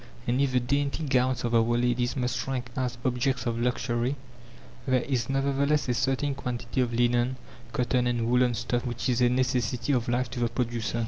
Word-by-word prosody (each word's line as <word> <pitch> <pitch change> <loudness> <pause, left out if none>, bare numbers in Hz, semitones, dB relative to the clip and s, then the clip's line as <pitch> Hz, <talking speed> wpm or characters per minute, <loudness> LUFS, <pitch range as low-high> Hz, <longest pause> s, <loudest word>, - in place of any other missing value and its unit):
And 125 +3 +1
if 140 -2 +2
the 125 - +4
dainty 140 +5 -1
gowns 130 -3 +1
of 120 -1 -1
our 115 - +6
ladies 120 +2 +1
must 125 -1 -1
rank 125 -2 -3
as 125 -1 -2
objects 130 0 0
of 115 -1 -1
luxury, 120 +1 0 0.7
there 130 -2 +2
is 125 -4 -1
nevertheless 140 +2 +1
a 125 - +1
certain 135 +3 0
quantity 125 -1 -3
of 120 -1 0
linen, 120 +1 +2 0.4
cotton, 125 0 +1
and 120 -2 0
woolen 125 0 +3
stuff 120 +1 -1
which 120 -2 -3
is 125 0 +1
a 120 - +5
necessity 125 0 0
of 120 -2 0
life 120 0 0
to 130 - -4
the 120 -1 +1
producer. 115 -1 -2
125 Hz, 190 wpm, -27 LUFS, 120-130 Hz, 0.7 s, our